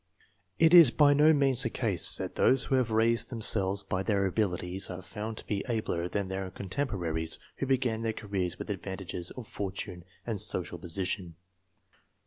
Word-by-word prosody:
It 165 +1 +4
is 170 -6 +10
by 145 +3 +4
no 150 +2 +5
means 135 -4 +3
the 120 - +5
case 110 -7 +4
that - - -5
those 130 0 +3
who - - -4
have 130 -3 +2
raised 115 +1 +2
themselves 100 -4 +2
by 95 -1 -3
their 100 0 0
abilities 95 -1 -1
are 90 0 -7
found 110 +2 -7
to - - -4
be 100 -2 -3
abler 90 -7 -2
than 100 -1 -2
their 95 0 -4
contemporaries 90 - -3 0.2
who 135 - -3
began 125 -4 0
their 115 -1 -1
careers 100 -5 -4
with - - -6
advantages 95 -2 -5
of 125 -4 -9
fortune 95 -2 -6 0.2
and 110 -4 -3
social - - -2
position. 90 0 -3
105 Hz, 170 wpm, -29 LUFS, 95-120 Hz, 0.2 s, is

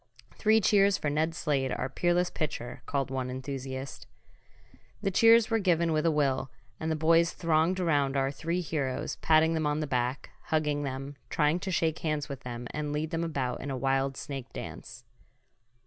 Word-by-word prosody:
"Three 220 +1 +3
cheers 200 -1 +4
for 145 - -2
Ned 160 +2 0
Slade, 140 -6 0
our - - -2
peerless 175 +5 +1
pitcher!" 140 -6 -4
called 135 -1 -1
one 130 -1 -2
enthusiast. 130 - -6 0.9
The 195 -2 -1
cheers 230 +3 +6
were 225 - +3
given 170 -4 +2
with 155 +2 +2
a - - +4
will, 135 -3 +1 0.3
and 160 - -2
the 160 - +1
boys 165 +2 +3
thronged 165 +2 +1
around 145 -6 +1
our 135 0 +1
three 165 +5 -2
heroes, 140 -5 -2
patting 160 +1 +4
them 160 -2 0
on 150 +1 0
the 155 - -1
back, 125 -1 -2
hugging 150 -2 0
them, 135 0 -5
trying 150 +2 +2
to 190 - -4
shake 160 -3 0
hands 150 -2 -1
with 140 -2 -6
them 120 -2 -6
and 150 -1 -3
lead 150 +2 -2
them 165 0 -1
about 135 -7 -2
in 140 - -5
a 135 - -2
wild 135 +1 0
snake 135 -2 -6
dance. - - -8
150 Hz, 180 wpm, -29 LUFS, 135-165 Hz, 0.9 s, cheers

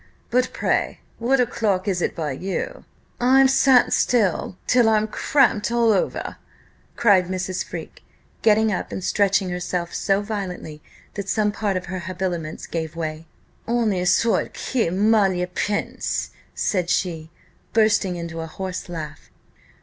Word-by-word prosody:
But 250 +1 +2
pray, - - -1 0.2
what 255 +4 +2
o'clock 210 -5 0
is 185 -3 0
it - - -1
by 155 -4 -2
you? 185 +8 -4 0.3
I've 265 +2 +5
sat 265 -2 +5 0.7
till 245 -3 +4
I'm 215 0 +2
cramped 235 -2 +2
all 235 -1 +3
over," 195 - -1 0.6
cried 195 -5 +4
Mrs. 185 0 -2
Freke, - - -8 0.4
getting 220 0 +4
up 185 - -3
and 190 - -5
stretching 195 -1 +2
herself 180 -1 -3
so 195 0 +1
violently 185 -7 -5 0.3
that 200 -1 -5
some 210 -1 +2
part 205 -2 -1
of 180 - -5
her 185 +1 -4
habiliments 175 -3 -4
gave 160 -1 -4
way. 160 -1 -5 0.4
"Honi 225 -6 +1
soit 200 +6 +2
qui 240 -9 -1
mal 200 +1 +3
y 180 0 -1
pense!" 200 +3 -2 0.2
said 180 -4 0
she, 165 -4 -1 0.4
bursting 215 -4 +2
into 170 -1 -5
a 165 - -5
horse 185 +2 -6
laugh. 155 -3 -7
190 Hz, 140 wpm, -23 LUFS, 180-220 Hz, 0.7 s, I've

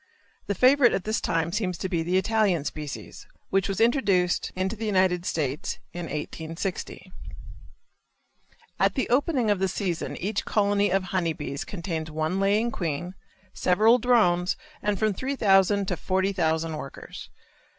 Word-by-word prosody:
The 200 - -1
favorite 255 +2 +5
at 190 - -1
this 215 +2 -1
time 165 0 0
seems 185 -3 -1
to 190 - -3
be 175 -3 -1
the 175 +3 +1
Italian 195 -6 +1
species, 150 -3 -7 0.2
which 195 0 +1
was 195 - -2
introduced 205 -7 +2
into 190 +3 -1
the 220 0 -4
United 185 -3 +2
States 145 -2 -2 0.2
in 175 0 -5
1860. 165 +4 -5 1.7
At - - +2
the 260 - 0
opening 255 -3 +2
of 205 - +1
the 190 - +1
season 185 -3 -3
each 205 +2 -2
colony 205 -1 +2
of 190 +1 +1
honey 180 -3 -1
bees 145 -2 -5
contains 170 -4 -4
one 155 +4 -1
laying 210 +4 +2
queen, 175 0 -3 0.4
several 215 +7 +4
drones, 185 -8 +3 0.2
and 210 -1 0
from 215 0 +1
3,000 200 -5 +2
to 180 - 0
40,000 165 -4 0
workers. 135 -2 -9
190 Hz, 145 wpm, -26 LUFS, 170-210 Hz, 1.7 s, favorite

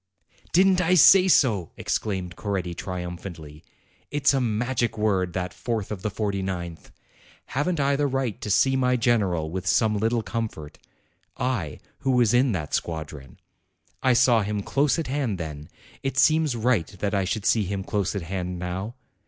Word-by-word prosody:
"Didn't 185 +1 +4
I 180 +1 +3
say 190 +2 +7
so!" 110 - +3
exclaimed 95 -4 -2
Coretti 95 -4 -3
triumphantly; 85 -3 -7 0.5
"it's 145 -1 +2
a 135 - +1
magic 120 +1 -1
word, 95 -5 0
that 90 -1 -3
fourth 110 +3 -3
of 100 -3 -5
the 105 - -2
forty 100 -1 -2
ninth! 85 -3 -5 0.6
Haven't 150 +5 -1
I 140 0 +2
the 145 +1 +1
right 130 -5 -2
to - - -4
see 130 +6 +3
my 125 -1 +2
general 100 -10 +1
with 95 +1 -4
some 110 +2 +3
little 115 +2 0
comfort, 110 -12 -5 0.6
I, 115 - -2 0.2
who 135 - -2
was 125 -4 +3
in 125 +1 +4
that 75 -5 -4
squadron? 75 -5 -4 0.6
I 130 - +4
saw 120 -1 +4
him 105 0 -2
close 140 - +1
at 165 - -2
hand 130 -7 -2
then; 75 -3 -7 0.3
it 135 -1 -3
seems 155 -2 +3
right 115 -6 +1
that 100 +2 -1
I 100 -1 +1
should 95 +2 -3
see 110 -3 +3
him 95 +1 -3
close 100 -1 -2
at 100 - -3
hand 90 +1 -4
now. 95 +6 -4
105 Hz, 170 wpm, -25 LUFS, 90-125 Hz, 0.6 s, say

